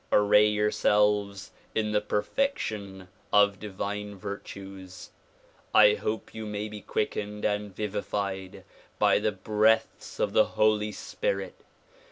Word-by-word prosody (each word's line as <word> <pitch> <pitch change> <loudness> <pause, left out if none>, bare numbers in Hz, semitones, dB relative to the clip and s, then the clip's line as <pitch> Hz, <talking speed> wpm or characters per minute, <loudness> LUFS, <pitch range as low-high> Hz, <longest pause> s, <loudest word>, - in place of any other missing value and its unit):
Array 105 +1 +5
yourselves 105 -1 +1 0.2
in 110 -1 0
the 105 0 +2
perfection 105 - -2 0.2
of 100 -1 +4
divine 105 0 -5
virtues. 95 -1 -8 0.6
I 105 -1 +8
hope 105 +1 -4
you 110 -1 -6
maj' 105 0 -4
be 105 -1 -8
ciuickened 105 -1 -3
and 105 -2 -1
vivified 100 -2 -4 0.3
by - - +4
the 110 - 0
breaths 110 +3 +1
of - - 0
the - - +5
Holy 105 0 +3
Spirit. - - -3
105 Hz, 115 wpm, -28 LUFS, 100-105 Hz, 0.6 s, I